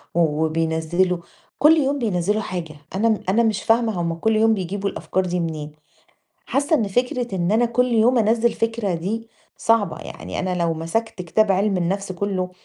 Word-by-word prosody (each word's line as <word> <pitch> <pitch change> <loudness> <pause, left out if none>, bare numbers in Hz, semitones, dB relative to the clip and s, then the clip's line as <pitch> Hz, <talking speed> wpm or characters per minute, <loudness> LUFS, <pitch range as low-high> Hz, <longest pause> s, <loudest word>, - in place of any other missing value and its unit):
وبينزِّلوا 160 +2 +1 0.4
كل 315 +2 +6
يوم 280 -1 +1
بينزِّلوا 210 -1 0
حاجة، 175 -6 -5 0.2
أنا 220 +2 +2
أنا 230 +5 +3
مش 215 -4 0
فاهمة 225 -5 +2
هُم 170 -1 -1
كل 220 +7 0
يوم 225 +1 +4
بيجيبوا 200 +1 -2
الأفكار 190 -1 -2
دي 180 0 -1
منين! 155 -3 -4 0.7
حاسة 285 +3 +1
إن 220 -8 0
فكرة 245 0 -1
إن 175 0 0
أنا 230 +3 +3
كل 250 +1 +1
يوم 235 +3 +4
أنزِّل 225 +1 +2
فكرة 225 -4 -1
دي 215 +7 -3 0.3
صعبة، 225 -3 +1
يعني - - -7
أنا 185 -1 -1
لو 170 -2 0
مسكت 180 +5 -3
كتاب 200 +4 +2
علم 195 0 +1
النفس 190 +2 -1
كله 185 -1 -2
200 Hz, 165 wpm, -22 LUFS, 175-225 Hz, 0.7 s, كل